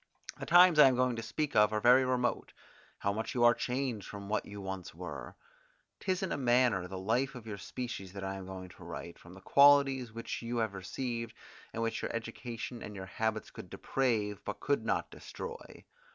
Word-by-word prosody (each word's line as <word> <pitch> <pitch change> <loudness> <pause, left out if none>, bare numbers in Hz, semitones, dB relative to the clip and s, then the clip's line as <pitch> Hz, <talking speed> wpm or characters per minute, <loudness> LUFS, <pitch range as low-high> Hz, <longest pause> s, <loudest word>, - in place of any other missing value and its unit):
The - - -6
times 175 -2 +7
I 145 - +10
am 130 - +3
going 125 -1 +2
to - - -2
speak 150 +6 -3
of 105 0 +6
are 110 - 0
very 125 +4 +6
remote. 125 -1 0 0.4
How 100 - -1
much 110 +4 -4
you 120 - +2
are 120 0 +8
changed 125 -5 -2
from 100 -1 -8
what 110 - -1
you 100 0 -8
once 95 -2 -6
were! - - -7 0.6
'Tis 185 -1 -1
in 190 - -2
a - - 0
manner 120 -7 +3
the 95 +1 -6
life 120 +8 0
of 120 -3 -9
your 105 -2 -6
species 120 -5 -6
that 100 -1 -6
I 95 0 -2
am 95 -1 -7
going 95 -1 -7
to 90 0 -14
write, 85 0 -8
from 85 +2 -14
the 95 - -13
qualities 140 0 +5
which 115 +1 -5
you 120 +1 -3
have 110 -3 0
received, 115 +4 -4 0.4
and 115 - -3
which 115 0 -1
your - - -3
education 115 +1 -5
and 105 - -7
your 95 -1 -6
habits 110 +3 -2
could - - -10
deprave, 110 -6 -1
but 105 - -5
could 140 -1 0
not - - -1
destroy. 470 0 -9
115 Hz, 210 wpm, -32 LUFS, 100-130 Hz, 0.6 s, I